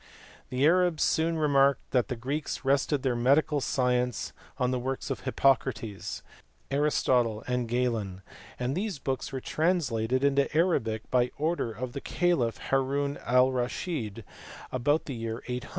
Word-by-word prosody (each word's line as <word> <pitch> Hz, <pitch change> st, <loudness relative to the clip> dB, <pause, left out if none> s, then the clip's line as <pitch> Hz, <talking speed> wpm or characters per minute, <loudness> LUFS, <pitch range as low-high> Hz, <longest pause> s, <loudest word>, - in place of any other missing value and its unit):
The 130 Hz, +2 st, +1 dB
Arabs 175 Hz, -1 st, +3 dB
soon 165 Hz, +1 st, +1 dB
remarked 140 Hz, -3 st, +2 dB
that 125 Hz, -1 st, +2 dB
the 125 Hz, -, -3 dB
Greeks 140 Hz, +5 st, -4 dB
rested 140 Hz, +1 st, +2 dB
their 130 Hz, -3 st, +1 dB
medical 140 Hz, +4 st, +3 dB
science 125 Hz, -2 st, 0 dB, 0.2 s
on 125 Hz, 0 st, +1 dB
the 130 Hz, -, 0 dB
works 130 Hz, +2 st, -3 dB
of 135 Hz, -, -2 dB
Hippocrates, 125 Hz, -6 st, 0 dB, 0.5 s
Aristotle, 125 Hz, -6 st, +2 dB
and 125 Hz, -1 st, -1 dB
Galen; 115 Hz, -6 st, -1 dB, 0.3 s
and 125 Hz, +2 st, -1 dB
these 195 Hz, -2 st, -2 dB
books 135 Hz, -1 st, -3 dB
were 135 Hz, -, -3 dB
translated 130 Hz, -7 st, 0 dB
into 140 Hz, 0 st, +2 dB
Arabic 115 Hz, -, +1 dB
by 125 Hz, -1 st, +3 dB
order 155 Hz, -5 st, -1 dB
of 120 Hz, +3 st, -6 dB
the 140 Hz, -, -5 dB
caliph 150 Hz, -, +1 dB
Haroun 140 Hz, +1 st, +1 dB
Al 125 Hz, +1 st, +5 dB
Raschid 120 Hz, -, -3 dB, 0.5 s
about 145 Hz, +5 st, +1 dB
the 140 Hz, -, -5 dB
year 115 Hz, 0 st, -5 dB
800. 125 Hz, 0 st, -4 dB
130 Hz, 145 wpm, -28 LUFS, 120-145 Hz, 0.5 s, Al